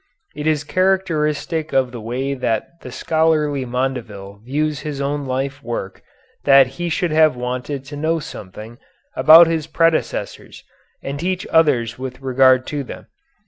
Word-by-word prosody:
It 150 +1 -4
is 155 -2 +1
characteristic 165 -3 0
of 130 -2 +2
the 120 -3 -8
way 130 +5 -3
that 115 -5 -1 0.2
the 125 - -9
scholarly 150 -2 0
Mondeville 115 -6 -4
views 150 +4 -2
his 150 -2 -5
own 140 0 -2
life 135 +2 -3
work 115 -7 -6 0.4
that 135 -1 +7 0.2
he 175 - -1
should 170 +1 -1
have 155 -3 +4
wanted 125 +3 -4
to 145 +2 -9
know 160 +3 0
something 110 - -9 0.4
about 155 +6 +8
his 160 -2 -2
predecessors 165 0 -1 0.4
and 140 +1 -5
teach 185 +2 -2
others 130 -8 +2
with 130 -1 -6
regard 130 -1 +3
to 145 -1 -2
them. - - -10
140 Hz, 145 wpm, -19 LUFS, 125-155 Hz, 0.4 s, about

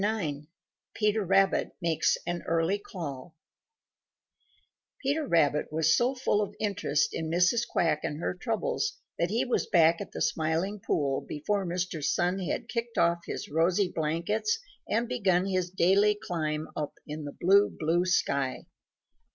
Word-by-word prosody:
IX 160 -9 -2 0.5
PETER 210 0 +1
RABBIT 195 +1 +2
MAKES 165 -3 +1
AN 175 0 -2
EARLY 165 +4 +1
CALL 160 -6 -7 1.7
Peter 290 +2 0
Rabbit 150 - +2
was 160 +1 +3
so 250 +3 +1
full 230 -4 +1
of 205 - -4
interest 180 -8 0
in 160 -1 -3
Mrs. 180 +8 +2
Quack 160 -3 +1
and 150 -2 -4
her - - -1
troubles 230 - -2 0.2
that 170 - +1
he 225 +4 +1
was 250 - 0
back 165 -1 +4
at - - -7
the - - -6
Smiling 165 +6 0
Pool 140 -7 0
before 195 +6 -1
Mr. 175 -3 -3
Sun 175 +5 +1
had 185 - -3
kicked 235 -1 -4
off 170 0 +3
his - - -4
rosy 175 +5 +1
blankets 170 - 0 0.3
and 230 +3 +1
begun 195 -7 +1
his 185 -2 -1
daily 195 +3 +3
climb 155 -4 -2
up 150 -1 -4
in 150 0 -6
the 145 - -8
blue, 200 +3 +5
blue 165 +3 0
sky. 140 -7 0
175 Hz, 150 wpm, -28 LUFS, 160-205 Hz, 1.7 s, blue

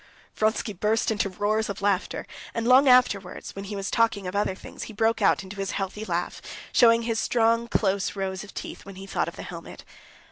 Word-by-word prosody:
Vronsky 215 0 0
burst 215 +4 +1
into 210 -2 0
roars 210 +3 0
of 200 - -4
laughter. 200 -1 0 0.3
And 230 0 -1
long 260 +3 +7
afterwards, 245 -7 +3
when 195 0 -6
he 205 +1 -5
was 195 0 -3
talking 225 -4 +2
of 180 +2 -4
other 200 -2 0
things, - - -9
he - - -9
broke 225 +2 +1
out - - +3
into 190 +2 -10
his 195 -1 -3
healthy 195 +2 -4
laugh, - - -2 0.3
showing 230 -1 +5
his 225 -1 -1
strong, 230 0 +2
close 200 -4 0
rows 190 0 -3
of 205 - -11
teeth, - - -7
when 195 -1 -11
he 195 +1 -9
thought 195 - -1
of - - -6
the - - -7
helmet. - - -9
210 Hz, 210 wpm, -26 LUFS, 195-225 Hz, 0.3 s, long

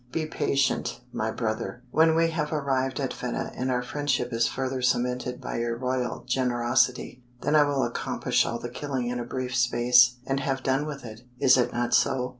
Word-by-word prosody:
Be 155 +3 -1
patient, 140 -4 0
my 110 - -1
brother. 110 +2 -3
When 160 +1 +4
we 165 0 +3
have 150 -2 -2
arrived 135 -3 -1
at 135 -2 -2
Fedah 125 -1 -4
and 130 +1 -2
our 125 -1 0
friendship 130 -2 -1
is 115 0 +2
further 130 -1 -3
cemented 125 0 0
by - - -4
your 115 0 -1
royal 125 -1 -2
generosity, 125 0 0 0.2
then 145 - 0
will 145 -3 +3
I - - +1
accomplish - - 0
all 120 - -2
the 120 +1 -6
killing 130 -1 -3
in 125 0 -3
a - - -2
brief 125 +1 -4
space 125 0 +5
and 135 +1 -1
have 135 -1 -2
done 135 +3 +1
with 140 -4 -7
it. 110 0 -9 0.2
Is 130 -1 +5
it 125 -2 +2
not 120 0 -1
so?" 125 -1 +2
125 Hz, 195 wpm, -26 LUFS, 120-135 Hz, 0.2 s, space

